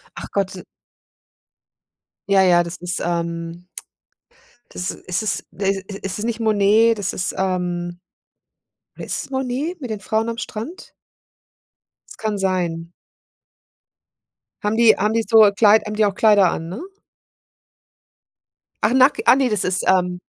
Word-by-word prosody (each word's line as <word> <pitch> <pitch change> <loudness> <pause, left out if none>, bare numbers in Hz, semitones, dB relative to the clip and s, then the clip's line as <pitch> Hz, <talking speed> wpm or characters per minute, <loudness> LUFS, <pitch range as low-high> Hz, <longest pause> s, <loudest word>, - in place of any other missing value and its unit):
Ach - - -8
Gott 190 -2 -2 1.7
Ja, 195 -1 +4
ja, 175 -2 +4
das 170 +1 -7
ist 180 0 -3
ähm 170 0 -4 1.0
das 180 - -3
ist 185 +4 -4
es 215 - -2
de 195 0 -1
i 195 +1 -9
ist 195 +2 -4
nicht 235 0 -3
Monet, 220 +1 +3
das 200 -1 -2
ist 180 - -2
ähm, 175 -2 -2 1.0
oder - - -8
ist - - -3
es - - -18
Monet 270 +6 -3
mit 250 - -6
den 210 - -4
Frauen 220 +3 -1
am 230 - -5
Strand? 240 - -7 1.2
Kann 215 -2 -2
sein. 175 -3 -2 1.7
Haben 210 +2 0
die 230 -2 +5
haben 210 +2 0
die 225 -1 0
so 220 -3 +7
Kleid 215 0 +5
haben 210 - -4
die 215 - +3
auch 195 - -1
Kleider 205 -4 +4
an, 165 +1 -5
ne? 190 +6 -6 2.1
Ach, 220 - +3
nack 265 +2 +4
ach, - - +7
ne, 265 -2 +2
das 210 -4 +1
ist, 185 0 0
ähm. 180 -1 +2
200 Hz, 140 wpm, -20 LUFS, 180-220 Hz, 2.1 s, so